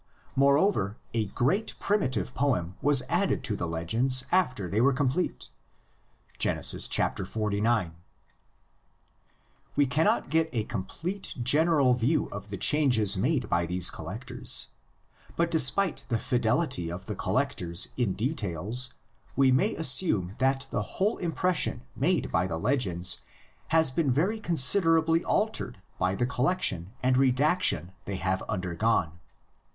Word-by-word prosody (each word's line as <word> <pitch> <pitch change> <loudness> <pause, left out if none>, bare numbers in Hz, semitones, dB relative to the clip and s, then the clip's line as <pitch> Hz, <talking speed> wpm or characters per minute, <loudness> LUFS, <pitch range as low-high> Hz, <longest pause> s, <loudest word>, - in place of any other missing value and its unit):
Moreover 140 - +2 0.2
a 115 -2 0
great, 140 - -1
primitive 130 - -1
poem 95 -11 -1
was 145 -2 +4
added - - 0
to - - 0
the 85 - -3
legends 115 +11 0
after 125 - +1
they 105 +5 0
were 135 +2 +4
complete 140 +6 -2 0.9
(Genesis - - +2
xlix). 105 0 0 1.8
We 145 - +3
cannot 145 +4 0
get 160 0 +2
a 115 -3 -1
complete 165 - -5
general 145 0 +3
view 125 +6 +1
of 100 +1 -8
the 100 - -5
changes 125 -9 +3
made 130 - 0
by 85 0 0
these 90 +1 0
collections, - - -2 0.7
but 170 0 0
despite 160 +5 +3
the 120 - 0
fidelity 120 - -1
of 90 +2 -7
the - - -4
collectors 85 0 -1
in 120 -7 0
details 110 - -2 0.4
we 135 -1 +4
may 190 - +1
assume 125 - +2
that 135 +1 +1
the - - -1 0.2
whole 205 +3 +1
impression 170 -7 -1
made 160 +10 0
by 90 - +1
the 80 -3 -4
legends 95 -5 0 0.5
has 160 -4 +2
been 140 0 0
very 185 - 0
considerably 165 -1 +3
altered 215 - -2 0.2
by 90 +1 0
the 120 - 0
collection 125 - 0
and 130 0 +2
redaction 135 - +2
they 100 - -4
have 95 0 -1
undergone. 90 -1 -1
125 Hz, 125 wpm, -27 LUFS, 100-160 Hz, 1.8 s, was